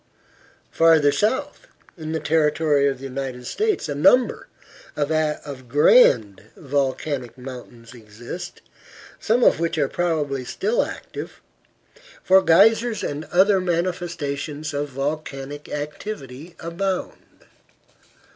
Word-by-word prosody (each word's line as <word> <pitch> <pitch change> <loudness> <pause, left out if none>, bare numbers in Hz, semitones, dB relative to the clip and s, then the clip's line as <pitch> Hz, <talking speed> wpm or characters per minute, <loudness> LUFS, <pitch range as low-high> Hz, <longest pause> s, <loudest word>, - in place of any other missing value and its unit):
Farther 160 -3 +5
south, 225 - -1 0.3
in 155 -2 -6
the 160 - -1
territory 150 -2 +2
of 135 -2 -1
the 130 - -14
United 130 -2 -5
States, 425 - -1
a 145 - -2
number 240 - +3 0.5
of 150 -3 -2
grand 115 - +4
volcanic 135 -3 -2
mountains 125 -2 -10
exist, 120 +8 -9 0.6
some 240 +3 +1
of - - +4
which 165 -1 -1
are 145 -3 +2
probably 150 -5 -1
still 440 - 0
active, - - -8 0.8
for 190 +1 +6
geysers 220 +5 +4
and 145 +2 -4
other 190 +2 +3
manifestations 165 -4 -3
of 145 0 -2
volcanic 140 +1 -5
activity 150 0 -7
abound. 185 +3 -5
150 Hz, 105 wpm, -22 LUFS, 135-175 Hz, 0.8 s, for